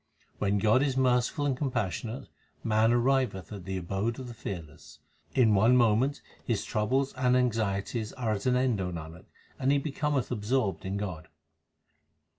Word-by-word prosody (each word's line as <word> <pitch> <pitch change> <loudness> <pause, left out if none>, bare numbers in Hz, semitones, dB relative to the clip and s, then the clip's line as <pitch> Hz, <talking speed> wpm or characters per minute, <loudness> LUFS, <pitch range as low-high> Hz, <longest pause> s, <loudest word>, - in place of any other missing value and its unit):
When 100 0 +1
God 110 +5 +4
is 135 -2 0
merciful 130 +3 +2
and 140 -2 +1
compassionate, 125 -2 -3 0.4
man 110 0 +3
arriveth 120 -5 +1
at 95 -4 -8
the 95 0 -3
abode 95 +6 -2
of 130 - -7
the 120 - -7
Fearless. 85 -8 -8 0.4
In 115 -5 +5
one 110 +5 +5
moment 120 +4 +2 0.2
his - - -1
troubles 130 +6 0
and 125 0 +2
anxieties 110 -2 -1
are 120 -4 -2
at 100 +2 -2
an 125 - +3
end, 125 -5 +1
O 90 -1 -2
Nanak, 85 +1 -8 0.3
and 135 +1 +2
he 140 - +4
becometh 140 -2 -1
absorbed 110 -2 -1
in 95 +1 -2
God. 90 -6 -5
115 Hz, 160 wpm, -29 LUFS, 100-130 Hz, 0.4 s, In